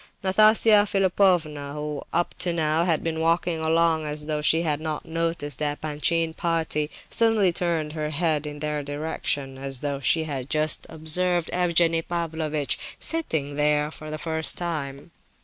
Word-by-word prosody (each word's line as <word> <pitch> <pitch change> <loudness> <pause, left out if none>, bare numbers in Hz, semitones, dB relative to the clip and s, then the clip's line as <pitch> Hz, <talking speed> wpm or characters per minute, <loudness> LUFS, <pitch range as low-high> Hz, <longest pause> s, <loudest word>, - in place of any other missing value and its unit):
Nastasia 215 +2 +5
Philipovna, 180 -7 +1
who 150 -1 -4
up 175 +1 0
to 180 -1 +4
now 160 0 +1
had 165 -3 +1
been 160 -1 -2
walking 165 0 +1
along 160 0 +2
as 150 0 -4
though 150 -1 -1
she 160 +2 +3
had 150 -2 -1
not 155 -1 -4
noticed 165 -4 -2
the 150 -1 0
Epanchin 160 +2 0
party, 165 -3 -1 0.2
suddenly 220 -6 +3
turned 165 -4 -1
her 155 -1 -3
head 155 -1 0
in 150 0 -7
their 150 0 -2
direction, 145 -2 -3
as 135 -2 -2
though 140 -1 -2
she 160 +5 +2
had 140 -4 -5
just 155 0 +1
observed 170 +2 0
Evgenie 170 -2 +2
Pavlovitch 160 -4 -1 0.2
sitting 160 - -2
there 150 0 +2
for 155 -1 -10
the 155 - -4
first 160 0 +1
time. 150 -4 -4
160 Hz, 155 wpm, -25 LUFS, 150-170 Hz, 0.2 s, Nastasia